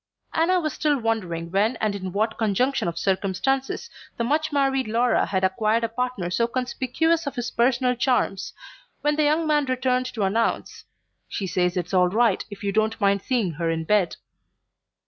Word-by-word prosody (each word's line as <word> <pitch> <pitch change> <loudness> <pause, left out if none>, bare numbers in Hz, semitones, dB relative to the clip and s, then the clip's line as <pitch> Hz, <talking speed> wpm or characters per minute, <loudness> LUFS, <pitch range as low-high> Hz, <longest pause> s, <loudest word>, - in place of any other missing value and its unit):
Anna 355 +3 +3
was 310 -4 -2
still 295 -2 +1
wondering 185 -8 -2
when 210 +6 +2
and 215 -2 -1
in 190 -2 -5
what 215 +4 -1
conjunction 230 +3 +1
of 170 - -3
circumstances 210 - -1 0.3
the 235 - 0
much 305 +6 0
married 270 -3 +1
Laura 235 +3 +2
had 190 -1 -1
acquired 215 +4 +1
a 230 - 0
partner 235 -6 -3
so 230 +5 +1
conspicuous 260 +7 0
for - - 0
his 245 -3 -4
personal 250 +1 +2
charms, 245 -6 0 0.5
when 295 0 +1
the 305 0 +2
young 310 +2 +2
man 300 -2 +2
returned 255 -1 0
to 235 -5 -3
announce: 220 +4 -1 0.4
"She 200 - -3
says 180 0 0
it's 180 +1 -3
all 180 -1 +5
right, 220 0 +2
if 205 0 -10
you 200 - 0
don't 220 +2 0
mind 200 -1 +2
seeing 235 -9 0
her 165 +1 -2
in 165 0 -1
bed." 190 -1 +2
230 Hz, 180 wpm, -24 LUFS, 195-260 Hz, 0.5 s, all